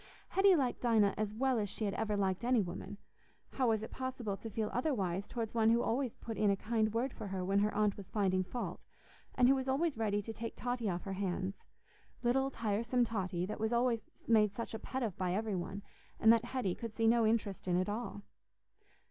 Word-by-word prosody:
Hetty 390 -1 +5
liked 265 -6 0
Dinah 220 -5 +4
as 210 0 -1
well 255 +2 +1
as 205 -2 -1
she 215 - -3
had 200 - -1
ever 210 -2 -1
liked 190 0 0
any 245 0 +3
woman; 190 +1 -4 0.5
how 255 -3 +1
was 220 -1 +1
it - - -7
possible 255 -6 -3
to 225 - -8
feel 215 0 -2
otherwise 200 - 0
towards 230 -3 -4
one 225 -1 +4
who 235 +1 +4
always 250 0 0
put 225 -2 -6
in 210 - +4
a 200 - +4
kind 220 +1 0
word 240 +4 -1
for 215 - -6
her 190 -1 -3
when 195 +2 +2
her 210 +1 +2
aunt 210 -1 +2
was 200 -3 -9
finding 190 -3 +1
fault, 185 -2 -5 0.5
and 250 -1 +5
who 265 - +7
was 265 -1 -1
always 275 -1 +1
ready 205 -2 +1
to 225 +2 -5
take 230 +1 -6
Totty 245 -3 -2
off 175 -1 -2
her 195 - -4
hands—little 200 +7 -3
tiresome 235 +1 0
Totty, 185 -5 -2
that 210 - -5
was 235 0 +1 0.2
made 210 -3 +4
such 230 +1 -4
a 220 - -4
pet 260 +3 -3
of 210 -6 -2
by 180 -1 0
every 215 0 -1
one, 190 +3 -4 0.4
and 225 +1 +7
that 230 0 +2
Hetty 240 -7 -1
could 230 +1 -7
see 225 - +1
no 230 +1 +5
interest 210 -4 -1
in 175 -1 +2
at 185 - 0
all? 210 -1 -4
220 Hz, 215 wpm, -34 LUFS, 200-240 Hz, 0.5 s, who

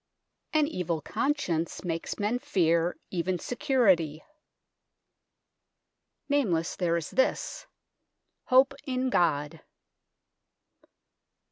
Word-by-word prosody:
"An 310 -1 +3
evil 175 - -2
conscience 200 - -1
makes 165 -2 -3
men 210 +4 0
fear 170 -4 +1
even 180 0 -1
security." 195 - +1 2.0
Nameless, 205 - +1
there 170 -2 +1
is 165 - -5
this: 260 - 0 0.4
" - - -54
Hope 260 +2 +5
in 255 -1 -1
God." 150 - +1
180 Hz, 85 wpm, -28 LUFS, 165-255 Hz, 2.0 s, Hope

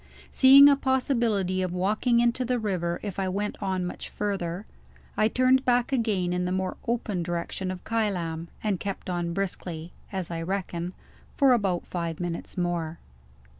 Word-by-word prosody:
Seeing 275 +2 +9
a 285 - +6
possibility 235 -9 +1
of 180 -1 -2
walking 215 +6 +2
into 240 +2 +2
the 250 0 0
river 180 -6 -1
if 200 -2 -4
I 190 -1 0
went 205 +3 -2
on 190 -2 -1
much 180 - -6
farther, 195 -2 -3 0.5
I 215 - +3
turned 255 +3 +3
back 245 -1 +2
again 210 -8 +1
in 180 0 0
the 180 - -1
more 185 0 -1
open 225 -6 -1
direction 175 +2 -3
of 185 -1 -6
Kylam, 175 -7 -1 0.2
and 205 -4 0
kept 195 -2 -4
on 175 -1 -2
briskly 175 -4 -4 0.2
(as 190 -4 -4
I 165 -1 -3
reckon) 180 -1 -3 0.4
for 275 -2 +6
about 195 -7 0
five 170 -2 -4
minutes 175 0 -5
more. 170 -2 -1
190 Hz, 165 wpm, -27 LUFS, 175-230 Hz, 0.5 s, Seeing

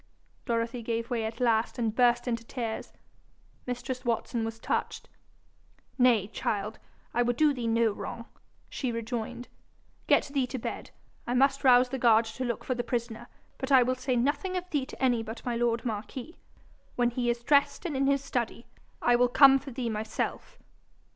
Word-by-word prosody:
Dorothy 230 +1 -1
gave 230 +1 -3
way 230 -2 0
at 220 +1 -5
last 230 -2 +1
and 225 -3 0
burst 240 0 +3
into 230 -1 -1
tears. 230 -2 -5 0.8
Mistress 250 +1 -4
Watson 235 -1 -1
was 225 0 -4
touched. - - -3 0.9
'Nay, 240 -5 +5
child, 210 0 -3 0.3
I 240 - +2
would 245 0 +1
do 305 -2 +4
thee 245 -3 -3
no 230 -1 +3
wrong,' 230 +3 -7 0.4
she 255 -3 -3
rejoined. 235 +1 -4 0.6
'Get - - +3
thee 270 -3 +1
to 260 - -5
bed. 230 - -5 0.4
I 245 - 0
must 275 +2 +3
rouse 250 -1 +6
the 265 +1 -3
guard 230 -1 +5
to 225 +3 -8
go - - -1
look 235 - -3
for 255 - -1
the 240 -1 -2
prisoner, 235 -1 -3 0.3
but 265 +1 -4
I 260 -2 +7
will 255 +1 +1
say 255 0 -2
nothing 290 +10 0
of 360 0 -4
thee 275 -3 0
to - - -11
any 245 -3 +2
but 225 +1 -8
my 240 -1 -1
lord 235 0 0
marquis. 235 - -5 0.6
When 240 -1 +2
he 240 0 -1
is 235 0 -1
dressed 285 +5 +2
and 320 -5 -2
in 270 +1 +1
his 280 0 +2
study, 235 -2 -3 0.4
I 245 - +5
will 245 0 +3
come 270 +1 +7
for 275 +1 -9
thee 245 -2 -3
myself.' 220 - -4
240 Hz, 185 wpm, -28 LUFS, 230-260 Hz, 0.9 s, I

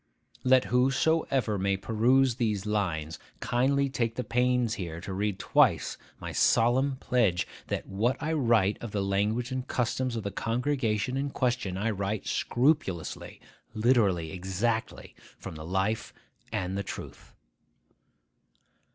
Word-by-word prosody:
Let 130 0 +5
whosoever 130 -3 +2
may 95 0 +1
peruse 120 +5 +2
these 105 -5 -1
lines 85 -7 -2 0.2
kindly 140 +3 +1
take 115 -4 -1
the 125 - -2
pains 125 0 +1
here 85 -6 -5
to 95 - -6
read 100 0 -1
twice - - +2 0.2
my - - -6
solemn 130 +4 +3
pledge, 115 -9 +1 0.2
that - - -3
what 110 +6 0
I 160 - -1
write 115 -9 +2
of 115 -3 -6
the 100 -2 0
language 105 +6 0
and 130 0 -3
customs 125 0 -1
of 110 - -3
the 100 - -3
congregation 125 +1 -1
in 140 +1 -1
question 120 -8 -1
I 110 +3 0
write 100 +1 -3
scrupulously, 120 - 0 0.3
literally, 105 -8 +2
exactly, 95 +6 -2 0.2
from - - -8
the 75 0 -8
life 95 +4 -1 0.4
and 95 -3 -2
the 100 - -1
truth. 100 - -9
115 Hz, 135 wpm, -28 LUFS, 100-125 Hz, 0.4 s, Let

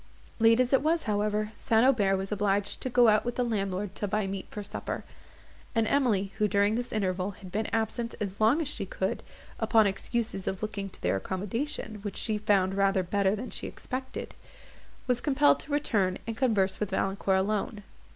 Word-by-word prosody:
Late 225 +1 +5
as 255 +1 +2
it 270 - +5
was, 320 +3 +2
however, 210 0 0
St. 225 -1 +3
Aubert 205 -8 +3
was 195 +1 -4
obliged 205 -1 0
to 255 - -2
go 245 -1 +5
out 215 -1 +4
with 240 0 -3
the 250 - +1
landlord 200 -4 -2
to 205 - -3
buy 210 +1 0
meat 195 0 -4
for 210 - -6
supper; 205 +1 -5 0.7
and 225 -1 +3
Emily, 215 -7 +1
who, 210 - +4
during 205 +1 +2
this 245 +2 -2
interval, 190 -2 -1
had 185 -3 -10
been 215 +3 -1
absent 225 +1 -1
as 200 0 -4
long 240 +9 +4
as - - -5
she 295 - -4
could, - - -2 0.4
upon 220 -2 +4
excuses 200 0 -2
of 190 +2 -3
looking 200 -2 -3
to - - -12
their 90 +2 +2
accommodation, 215 - -3
which 205 -1 -5
she 215 -2 -1
found 195 -3 +2
rather 195 -1 +2
better 195 +2 +1
than 240 +4 -6
she - - -4
expected, 260 0 -6 0.7
was 250 -1 +1
compelled 290 0 +4
to 295 - -8
return, 205 -10 +1
and 230 - -4
converse 210 -7 +1
with 210 - -1
Valancourt 195 0 +1
alone. 205 +2 -1
210 Hz, 190 wpm, -29 LUFS, 195-235 Hz, 0.7 s, Late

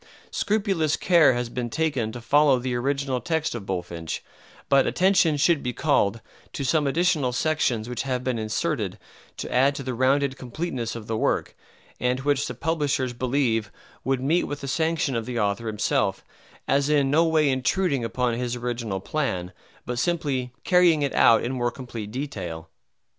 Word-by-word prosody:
Scrupulous 195 -8 0
care 170 -7 +5
has 120 0 -2
been 120 0 -4
taken 135 -5 -1
to 120 - -8
follow 145 +2 +4
the 125 0 -3
original 135 +1 -1
text 160 +3 -1
of 115 -5 -7
Bulfinch, 85 -3 -4 0.4
but 140 -1 +4
attention 185 -4 +3
should 155 +1 +3
be 125 - -3
called 115 -8 +1 0.3
to 140 - -3
some 145 +2 +2
additional 155 -3 +2
sections 125 -5 0
which 125 0 -3
have 130 -2 -2
been 125 -3 -1
inserted 110 0 -2 0.4
to - - -5
add 135 +3 +4
to 140 - -5
the 130 -1 -3
rounded 130 +2 +1
completeness 125 -2 -4
of 115 -2 -7
the 115 - -2
work, - - 0 0.4
and 125 +1 0
which 140 0 +1
the 125 - -6
publishers 145 -3 -1
believe 120 -4 0 0.3
would 135 0 0
meet 160 +6 +2
with 145 0 -5
the 140 - -5
sanction 160 -1 0
of 115 0 -2
the 120 -2 -2
author 105 +2 -1
himself, 105 -2 0 0.4
as 140 +1 +2
in 140 -3 +3
no 160 +3 +5
way 160 -2 +3
intruding 135 +2 +1
upon 120 +1 0
his 120 +1 -2
original 120 -5 -3
plan 95 -11 -2 0.3
but 120 0 -3
simply 140 -6 -1
carrying 175 -5 +4
it 140 - -1
out 115 -1 +5
in 120 - -2
more 120 -2 0
complete 120 -4 -7
detail. 105 - -6
130 Hz, 170 wpm, -25 LUFS, 120-150 Hz, 0.4 s, care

